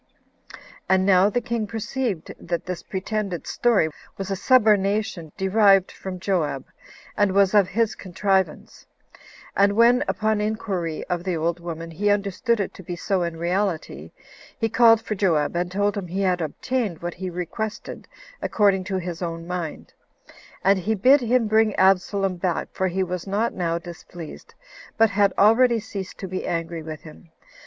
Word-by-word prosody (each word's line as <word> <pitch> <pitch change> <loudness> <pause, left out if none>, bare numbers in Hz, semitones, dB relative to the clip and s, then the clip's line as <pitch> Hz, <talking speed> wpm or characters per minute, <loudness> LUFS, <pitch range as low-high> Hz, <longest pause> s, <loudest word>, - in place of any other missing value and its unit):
And 190 0 +3
now 190 0 +5
the 245 +3 -1
king 235 -2 -2
perceived 225 - -3
that 170 0 -4
this 180 -1 -4
pretended 195 -2 -4
story 225 -10 +2 0.3
was 195 0 -5
a - - 0
subornation 205 - +2
derived 195 -1 +4
from 185 -1 -7
Joab, 170 -8 -1 0.5
and 205 -2 +2
was 200 -1 +4
of 205 -3 +5
his 225 +3 0
contrivance; 190 0 -2 0.7
and 200 0 +4
when, 235 +3 +5
upon 210 +3 0
inquiry 195 -7 -2
of 175 -1 -3
the 180 -2 -1
old 170 +2 -1
woman, 165 -1 -6
he 200 +6 0
understood 205 +3 +1
it 200 - -2
to - - -11
be 180 0 -6
so 190 +2 -1
in 170 -1 -3
reality, 175 0 -2 0.5
he 225 - 0
called 230 -1 +5
for - - -3
Joab, 170 -7 +1
and 175 +1 -1
told 205 +1 0
him 200 -3 -4
he 190 +3 -3
had 180 -2 +1
obtained 185 - -3
what 175 0 -3
he 185 +1 -5
requested 180 +5 -5 0.3
according 195 -3 +2
to 190 0 -2
his 175 -1 -5
own 165 -1 -4
mind; 175 -3 -5 0.7
and 195 0 +4
he 220 +5 0
bid 260 +8 +5
him 240 0 +2
bring 220 0 +2
Absalom 190 0 +2
back, 175 -1 -2
for 190 - -1
he 190 +1 0
was 180 0 -4
not 210 +4 0
now 170 -2 -1
displeased, 170 -1 -10 0.4
but 225 -1 +4
had 200 -1 +3
already 230 +3 +5
ceased 200 -3 -7
to 190 - -6
be 185 0 -4
angry 165 -1 -3
with 155 -1 -7
him. 165 +2 -14
190 Hz, 165 wpm, -23 LUFS, 175-210 Hz, 0.7 s, now